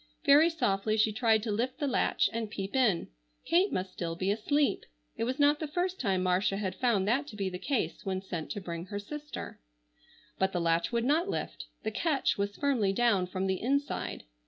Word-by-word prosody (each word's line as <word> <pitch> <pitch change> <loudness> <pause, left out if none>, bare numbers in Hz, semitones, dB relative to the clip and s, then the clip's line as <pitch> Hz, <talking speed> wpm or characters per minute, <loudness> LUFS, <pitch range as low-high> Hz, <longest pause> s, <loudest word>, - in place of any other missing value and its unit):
Very 295 +3 +7
softly 215 -9 0
she 215 0 +3
tried 220 -2 +3
to 225 - -2
lift 240 +5 -1
the 300 - -1
latch 260 -3 +2
and 225 -1 -2
peep 195 +1 -5
in. 230 -10 +2 0.4
Kate 365 +4 +3
must 185 0 -3
still 165 -1 -3
be 185 +3 0
asleep. 225 +2 +1 0.3
It 230 - -1
was 255 +2 -2
not 290 0 +4
the 310 - -3
first 360 +4 -2
time 190 -6 +1
Marcia 185 +2 +1
had 195 -2 -2
found 210 -4 +1
that 270 +6 +1
to 220 - -9
be 195 -2 -1
the 180 - -5
case 270 +2 -2
when 190 -2 -2
sent 175 -5 -5
to 205 - -5
bring 170 -1 -5
her 205 - -4
sister. 295 +8 -7 0.8
But 190 0 +1
the 180 - 0
latch 170 +2 +1
would 235 0 0
not 320 +8 +2
lift. - - -4 0.2
The 220 - -1
catch 285 +4 +1
was 200 0 -2
firmly 245 -9 +1
down 205 -5 +2
from 185 +1 -2
the 190 -1 -1
inside. 280 +4 -1
220 Hz, 205 wpm, -30 LUFS, 190-280 Hz, 0.8 s, Very